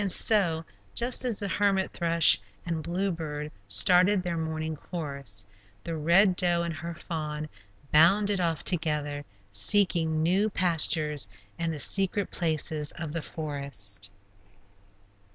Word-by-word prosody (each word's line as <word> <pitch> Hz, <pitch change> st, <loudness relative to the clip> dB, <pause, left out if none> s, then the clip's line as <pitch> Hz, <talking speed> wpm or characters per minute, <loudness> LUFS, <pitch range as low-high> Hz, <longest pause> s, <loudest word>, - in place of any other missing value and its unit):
And 200 Hz, -2 st, +2 dB
so, 175 Hz, -8 st, +4 dB, 0.3 s
just 245 Hz, +2 st, +3 dB
as 240 Hz, -5 st, 0 dB
the 200 Hz, -, -2 dB
hermit 195 Hz, -1 st, 0 dB
thrush 170 Hz, -, +4 dB, 0.2 s
and 165 Hz, -2 st, -3 dB
bluebird 165 Hz, -4 st, -4 dB, 0.2 s
started 180 Hz, -, +4 dB
their 175 Hz, -2 st, -3 dB
morning 160 Hz, -1 st, -4 dB
chorus, 140 Hz, -, -5 dB, 0.4 s
the 165 Hz, -, -4 dB
Red 175 Hz, +5 st, +3 dB
Doe 175 Hz, -1 st, +1 dB
and 170 Hz, -1 st, -3 dB
her 170 Hz, +1 st, -7 dB
fawn 155 Hz, -2 st, -5 dB, 0.4 s
bounded 195 Hz, +5 st, +4 dB
off 165 Hz, -3 st, -1 dB
together, 150 Hz, -4 st, -1 dB, 0.3 s
seeking 160 Hz, -, +3 dB
new 190 Hz, +6 st, +2 dB
pastures 160 Hz, -5 st, +1 dB, 0.3 s
in 165 Hz, 0 st, -1 dB
the 160 Hz, -, -4 dB
secret 195 Hz, +5 st, +1 dB
places 155 Hz, -3 st, -1 dB
of 160 Hz, -3 st, -5 dB
the 165 Hz, -, -3 dB
forest. 140 Hz, -13 st, -4 dB
165 Hz, 125 wpm, -27 LUFS, 150-185 Hz, 0.4 s, so